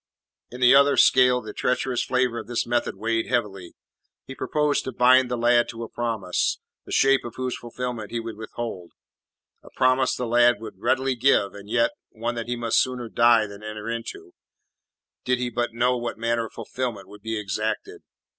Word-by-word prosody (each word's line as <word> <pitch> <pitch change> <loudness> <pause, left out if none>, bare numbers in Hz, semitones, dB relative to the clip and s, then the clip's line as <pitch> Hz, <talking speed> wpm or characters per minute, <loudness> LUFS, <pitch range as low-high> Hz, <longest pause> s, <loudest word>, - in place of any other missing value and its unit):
In 125 +1 -10
the 125 +1 +7
other 140 +1 +5
scale 125 -1 +5
the 110 -2 -8
treacherous 125 -1 -1
flavour 125 -2 0
of - - -9
this 120 -1 -1
method 120 -3 -1
weighed 115 +3 -1
heavily. 100 -8 -2 0.5
He 135 - -8
proposed 150 +1 0
to 130 - -3
bind 125 +1 +4
the 125 - -2
lad 120 0 +3
to 115 0 -6
a 115 - -7
promise, 110 -7 -1 0.3
the - - -9
shape 135 -1 +3
of 120 - -8
whose 130 -1 -3
fulfilment 120 -2 -6
he 120 - -3
would 115 -1 -6
withhold 110 -4 -7 0.7
a - - -15
promise 130 0 +2
the 125 - -3
lad 120 -1 +4
would 110 -4 -10
readily 130 +4 +1
give, 120 -5 +2
and 100 0 -12
yet, 115 +1 +2 0.2
one 115 +2 -4
that 115 -1 -5
he 120 - -2
must 115 -1 +2
sooner 125 -2 -3
die 115 -1 +4
than 100 0 -11
enter 110 0 -7
into, 360 - -6 0.9
did 125 0 +1
he 120 0 -3
but 120 0 -2
know 125 +2 +2
what 120 -2 -4
manner 115 0 -1
of - - -20
fulfilment 115 -3 -5
would 105 0 -14
be 110 +1 -3
exacted. 105 +1 -3
120 Hz, 190 wpm, -24 LUFS, 110-125 Hz, 0.9 s, the